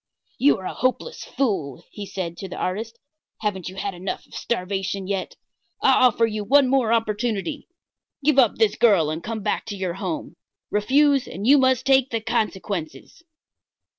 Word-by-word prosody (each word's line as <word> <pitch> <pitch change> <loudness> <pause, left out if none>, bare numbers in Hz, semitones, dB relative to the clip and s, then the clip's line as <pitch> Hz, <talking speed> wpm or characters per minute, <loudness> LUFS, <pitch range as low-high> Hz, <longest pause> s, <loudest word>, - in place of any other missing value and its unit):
"You 285 +2 +4
are 190 - -9
a - - -3
hopeless 255 - -2
fool," 190 - -2
he 205 -2 -7
said 175 -4 -4
to 190 +2 -7
the - - -7
artist. 220 +5 -3 0.4
"Haven't 190 -5 -2
you 185 - -11
had 195 +1 -3
enough 180 +2 -5
of - - -22
starvation 195 -2 -2
yet? 195 -1 -3 0.4
I - - +4
offer 240 -2 +4
you 215 -2 -3
one 275 +5 +5
more 255 -4 +2
opportunity. 225 +4 -1 0.6
Give 295 -2 +4
up 240 -5 +4
this 220 -2 +2
girl 190 -10 +4
and 160 +2 -5
come 220 -1 -4
back 210 - -1
to 205 - -4
your 185 -2 -2
home. 300 - -5 0.3
Refuse, 275 +6 +3
and 195 +5 -6
you 280 +4 +6
must 260 -1 +2
take 270 -1 +4
the 230 - -1
consequences." 210 - -3
215 Hz, 170 wpm, -23 LUFS, 190-255 Hz, 0.6 s, you